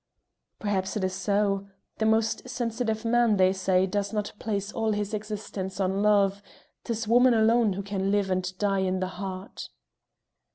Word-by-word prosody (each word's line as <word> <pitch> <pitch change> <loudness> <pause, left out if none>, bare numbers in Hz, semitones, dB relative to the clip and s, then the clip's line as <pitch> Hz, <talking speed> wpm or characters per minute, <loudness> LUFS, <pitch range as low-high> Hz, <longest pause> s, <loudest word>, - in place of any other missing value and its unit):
"Perhaps 195 -2 -2
'tis 185 -3 -1
so. 200 +1 0 0.3
The 220 - +2
most 220 +2 +1
sensitive 230 -2 -2
man, 235 -2 +3
they 185 0 +4
say, 190 -1 +2
does 200 +1 -2
not 210 -2 -2
place 205 -2 -2
all 220 -1 0
his 205 0 -3
existence 205 -3 -5
on 190 +1 0
love; 200 -1 +3 0.4
'tis 225 -1 -3
woman 245 +2 +5
alone 225 -1 +4
who 200 +2 -4
can 195 -1 -2
live 200 -1 +1
and 185 0 -1
die 200 -1 +1
in 185 0 0
the 185 - 0 0.2
heart." 190 0 -6
205 Hz, 160 wpm, -27 LUFS, 190-220 Hz, 0.4 s, woman